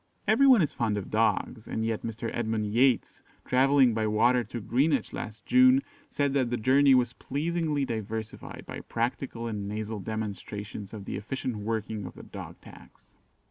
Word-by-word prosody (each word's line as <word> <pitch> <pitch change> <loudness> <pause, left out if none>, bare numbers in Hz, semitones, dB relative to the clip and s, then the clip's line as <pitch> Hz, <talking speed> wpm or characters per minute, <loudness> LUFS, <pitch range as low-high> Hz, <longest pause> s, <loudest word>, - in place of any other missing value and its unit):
Every 235 +7 +5
one 245 -9 +7
is 150 - -2
fond 110 -3 0
of 100 - -5
dogs, 110 +1 0
and 110 - -2
yet 115 -1 -1
Mr. 115 0 -4
Edmund 110 -2 -1
Yates, 120 +4 +2 0.2
travelling 130 -1 +4
by 110 -1 0
water 120 +4 +3
to 120 +3 -6
Greenwich 130 +4 +1
last 105 +1 -7
June, 255 +1 +5 0.3
said 145 - 0
that 130 -4 +1
the 120 - -1
journey 135 +4 +5
was 125 -1 +2
pleasingly 150 +1 -1
diversified 110 -1 -5
by - - -7
practical 115 0 -3
and 105 -3 -3
nasal 110 +1 -4
demonstrations 105 -1 -5
of 105 -3 -8
the - - -4
efficient 120 +2 -4
working 105 -2 -3
of 90 - -11
the - - -11
Dog - - -9
tax. - - -16
115 Hz, 170 wpm, -28 LUFS, 110-135 Hz, 0.3 s, one